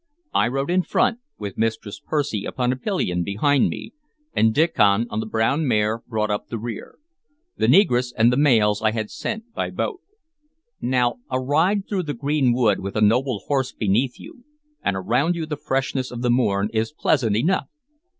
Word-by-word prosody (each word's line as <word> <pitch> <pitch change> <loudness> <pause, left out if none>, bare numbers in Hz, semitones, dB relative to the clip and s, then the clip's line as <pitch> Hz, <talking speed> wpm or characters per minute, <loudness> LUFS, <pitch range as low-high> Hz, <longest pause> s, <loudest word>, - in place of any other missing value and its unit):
I - - +3
rode 135 +5 -2
in 185 +1 +3
front, 230 +5 +1 0.2
with 100 -3 -6
Mistress 110 -2 -2
Percy 145 -9 -1
upon 125 -1 -1
a - - -1
pillion 130 - -1
behind 130 - +2
me, - - -7 0.4
and 110 0 +3
Diccon 110 -7 +3
on 105 - -2
the 110 - -3
brown 115 +8 +1
mare 110 -1 +1
brought 110 -3 -1
up 105 - -3
the 115 - -4
rear. 115 -1 -7 0.6
The - - +1
negress 125 -11 +4
and 115 +2 +4
the - - +1
mails 110 -8 +3
I 110 -1 +2
had 110 -2 -3
sent 225 +2 -5
by - - -2
boat. 390 -6 -3 0.8
Now, 120 -1 +1
a 130 - 0
ride 165 +10 +1
through 195 -3 -1
the 150 -4 -4
green 140 -3 +1
wood 120 -5 +2
with 100 0 -6
a 110 - 0
noble 115 0 +2
horse 135 -3 -1
beneath 115 +5 0
you, 245 - -13 0.4
and 100 - 0
around 125 - +1
you 165 -2 -3
the 155 -1 -4
freshness 135 -2 -2
of 120 0 -6
the 120 - +2
morn, 105 -5 +1
is 110 +4 0
pleasant 130 -8 +1
enough. 165 - +1
125 Hz, 185 wpm, -22 LUFS, 110-145 Hz, 0.8 s, negress